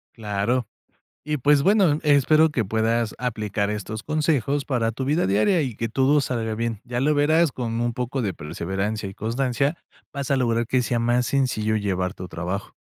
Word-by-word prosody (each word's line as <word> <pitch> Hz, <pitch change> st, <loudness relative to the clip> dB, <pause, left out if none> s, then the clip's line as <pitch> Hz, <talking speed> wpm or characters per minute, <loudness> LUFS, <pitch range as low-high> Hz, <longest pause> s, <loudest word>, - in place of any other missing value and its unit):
Claro. 110 Hz, +3 st, -1 dB, 0.6 s
Y, 150 Hz, 0 st, 0 dB
pues, 145 Hz, +1 st, +3 dB
bueno, 190 Hz, -6 st, +4 dB
espero 155 Hz, +2 st, +4 dB
que 120 Hz, -7 st, 0 dB
puedas 110 Hz, +2 st, 0 dB
aplicar 110 Hz, -4 st, -2 dB
estos 105 Hz, +1 st, -5 dB
consejos 145 Hz, -3 st, 0 dB
para 115 Hz, -4 st, 0 dB
tu 130 Hz, +4 st, -4 dB
vida 150 Hz, +5 st, +1 dB
diaria 110 Hz, -, +3 dB
y 130 Hz, -6 st, -3 dB
que 115 Hz, -, -1 dB
todo 135 Hz, +5 st, +3 dB
salga 115 Hz, -4 st, -2 dB
bien. 115 Hz, -1 st, -3 dB
Ya 120 Hz, 0 st, -3 dB
lo 150 Hz, +3 st, +2 dB
verás, 155 Hz, +2 st, +3 dB
con 115 Hz, -2 st, -3 dB
un 120 Hz, 0 st, 0 dB
poco 125 Hz, +2 st, -3 dB
de 100 Hz, -5 st, -1 dB
perseverancia 95 Hz, +7 st, -3 dB
y -, -, -10 dB
constancia 125 Hz, -, -1 dB, 0.4 s
vas 140 Hz, -1 st, -4 dB
a -, -, +4 dB
lograr 115 Hz, -2 st, +1 dB
que 130 Hz, +1 st, +2 dB
sea 120 Hz, -1 st, -1 dB
más 120 Hz, +1 st, +1 dB
sencillo 115 Hz, -6 st, 0 dB
llevar 95 Hz, -3 st, -1 dB
tu 90 Hz, -, -8 dB
trabajo. 90 Hz, +3 st, -5 dB
120 Hz, 180 wpm, -23 LUFS, 110-140 Hz, 0.6 s, bueno